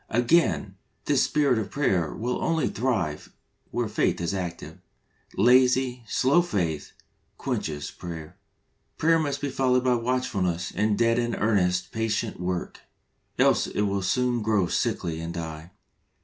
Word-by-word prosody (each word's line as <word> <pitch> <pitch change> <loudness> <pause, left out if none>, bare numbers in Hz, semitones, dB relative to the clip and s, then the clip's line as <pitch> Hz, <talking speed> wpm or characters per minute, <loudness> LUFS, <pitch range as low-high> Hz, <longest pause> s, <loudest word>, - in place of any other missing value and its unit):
Again, 120 - +2 0.3
this 145 -3 +3
spirit 140 -6 +2
of 105 -2 -4
prayer 95 - 0
will 120 +3 -2
only 160 -4 +1
thrive 95 - -2 0.4
where 120 -1 -1
faith 105 - 0
is 85 +2 -2
active. 90 -3 -5 0.6
Lazy, 125 +2 +4
slow 135 +9 +3
faith, 85 - -2 0.4
quenches 75 -2 -3
prayer. 85 -1 -8 0.6
Prayer 165 +1 +3
must 145 -3 -2
be 145 - -1
followed 125 -1 +2
by 130 -1 +3
watchfulness 115 -8 -1
and 105 0 +1
dead 115 0 +3
in 120 -1 -1
earnest, 90 -4 +1
patient 110 -5 -2
work, 90 0 -3 0.6
else, - - +3
it - - -2
will 100 -1 0
soon 120 +5 +1
grow 105 -3 +2
sickly 85 -1 -1
and 85 +1 -5
die. 80 -1 -6
110 Hz, 135 wpm, -26 LUFS, 90-125 Hz, 0.6 s, Lazy